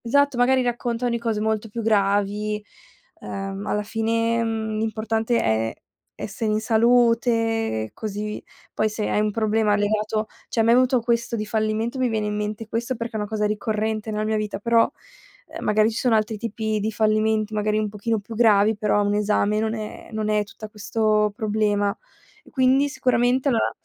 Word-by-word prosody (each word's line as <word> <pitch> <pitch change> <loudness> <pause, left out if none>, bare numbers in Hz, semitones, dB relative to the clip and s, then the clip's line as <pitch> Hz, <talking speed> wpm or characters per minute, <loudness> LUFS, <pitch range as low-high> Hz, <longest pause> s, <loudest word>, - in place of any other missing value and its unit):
Esatto, 285 +3 +3
magari 255 +1 +3
raccontan 240 0 -1
di 235 - -1
cose 225 -2 -1
molto 220 0 -1
più 230 +2 -5
gravi, 210 0 +1 0.6
ehm, 195 +1 -5
alla 210 - 0
fine, 230 +2 0
mhmm, 220 -1 -2
l'importante 220 +1 0
è 110 0 0 0.4
essere 215 +1 -3
in 215 - +1
salute 225 - +2
così 210 0 -5 0.3
poi 215 - +1
se 210 0 -3
hai - - +1
un 210 0 +1
problema 215 -1 +1
legato 215 +1 0 0.2
cioè, - - -2
a - - +5
me 230 - +4
è - - +7
venuto 255 +1 +4
questo 235 0 0
di 215 -1 -3
fallimento. 220 +3 -1
Mi 255 -1 +2
viene 220 -2 -1
in 210 - -2
mente 210 +1 -4
questo 235 +3 -2
perché 230 0 -5
è - - -1
una 210 - -3
cosa 210 0 -1
ricorrente 215 +1 -2
nella 210 0 -1
mia 215 0 0
vita, 210 -2 -3
però, 230 +2 +3 0.6
ehm, - - -8
magari 215 +1 +3
ci 225 - -5
sono 245 -3 +2
altri 215 0 0
tipi 220 -1 -2
di 215 +2 -1
fallimenti, 215 0 +1
magari 210 0 0
un 215 0 0
pochino 215 +2 -2
più 205 +3 -10
gravi, 215 -1 +4
però 205 0 +1
un 205 0 +1
esame 210 0 +1
non 220 +1 -1
è 215 -1 -7
non 215 -1 -2
è 210 -1 +2
tutta 215 +1 -10
questo 210 0 0
problema. 210 -2 0 0.5
E - - -18
quindi 265 +1 +3
sicuramente 255 0 +1
allora 235 -4 +1
220 Hz, 185 wpm, -23 LUFS, 210-230 Hz, 0.6 s, è